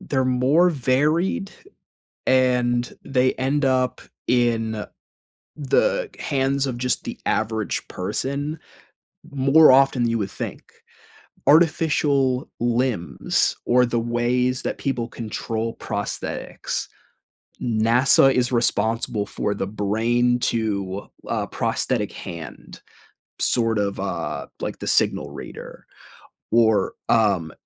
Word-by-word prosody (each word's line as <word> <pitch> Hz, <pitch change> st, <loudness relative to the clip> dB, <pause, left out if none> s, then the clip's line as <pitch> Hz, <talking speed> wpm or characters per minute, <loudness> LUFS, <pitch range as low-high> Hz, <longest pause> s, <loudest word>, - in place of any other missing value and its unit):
they're 130 Hz, -2 st, -1 dB
more 130 Hz, +8 st, +3 dB
varied, 160 Hz, -, +1 dB, 0.8 s
and 125 Hz, -2 st, +2 dB
they 130 Hz, -1 st, +1 dB
end 135 Hz, +2 st, 0 dB
up 130 Hz, -1 st, +1 dB, 0.3 s
in 115 Hz, -3 st, +1 dB, 0.7 s
the 470 Hz, -, +1 dB
hands 135 Hz, 0 st, 0 dB
of 125 Hz, -3 st, -3 dB
just 125 Hz, 0 st, -1 dB
the -, -, -6 dB
average 110 Hz, -1 st, -1 dB
person 140 Hz, -, -3 dB, 0.7 s
more 140 Hz, +3 st, +6 dB
often 135 Hz, -1 st, +4 dB
than 115 Hz, -, +1 dB
you 115 Hz, -, 0 dB
would 100 Hz, -3 st, -3 dB
think. 90 Hz, -, -6 dB, 0.8 s
Artificial 145 Hz, -4 st, +3 dB
limbs 120 Hz, -6 st, 0 dB
or 125 Hz, +1 st, +4 dB
the 120 Hz, -1 st, 0 dB
ways 120 Hz, +2 st, 0 dB
that -, -, -3 dB
people 125 Hz, -4 st, -2 dB
control 115 Hz, 0 st, -4 dB
prosthetics, -, -, -4 dB, 0.7 s
NASA 120 Hz, +4 st, +4 dB
is 125 Hz, -1 st, 0 dB
responsible 110 Hz, -3 st, +1 dB
for 100 Hz, -, -2 dB
the 100 Hz, -, -3 dB
brain 115 Hz, +4 st, +1 dB
to, 100 Hz, -5 st, -2 dB, 0.2 s
uh, -, -, -1 dB
prosthetic -, -, -1 dB
hand, 85 Hz, -2 st, -9 dB, 0.6 s
sort 115 Hz, -2 st, +1 dB
of, 100 Hz, -1 st, -2 dB
uh, 70 Hz, -, -4 dB
like -, -, -4 dB
the -, -, -6 dB
signal -, -, +1 dB
reader, -, -, -10 dB, 0.7 s
or, 110 Hz, -4 st, +3 dB, 0.2 s
um, 100 Hz, -8 st, +2 dB
125 Hz, 105 wpm, -23 LUFS, 110-135 Hz, 0.8 s, more